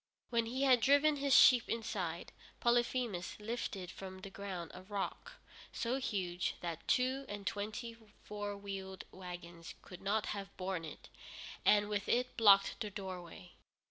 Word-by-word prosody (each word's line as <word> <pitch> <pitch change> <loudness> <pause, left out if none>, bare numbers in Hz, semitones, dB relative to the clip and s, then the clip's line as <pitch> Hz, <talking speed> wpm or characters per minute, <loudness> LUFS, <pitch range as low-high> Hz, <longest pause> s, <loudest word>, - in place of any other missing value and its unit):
When 230 -1 +2
he 260 +4 -1
had 255 -3 +5
driven 285 +3 +5
his 280 -1 +3
sheep 250 -2 +7
inside, 230 0 -3 0.3
Polyphemus 240 -6 +1
lifted 210 -4 -4
from 190 -1 -8
the 195 - -8
ground 190 -4 -6
a - - -9
rock 200 - -4 0.4
so 245 +3 -1
huge 185 -7 -1
that 170 -2 -5
two 260 +2 +2
and 205 -1 -6
twenty 225 +3 -3 0.3
four 205 -1 -4
wheeled 195 -1 -6
wagons 175 -2 -9
could 180 - -11
not 210 +2 +1
have 200 -1 -7
borne 185 -3 -3
it, 155 - -10 0.5
and 205 0 +5
with 205 -1 -2
it 250 +1 +1
blocked 200 -3 +6
the 210 - -2
doorway. 185 - -8
205 Hz, 145 wpm, -35 LUFS, 185-235 Hz, 0.5 s, sheep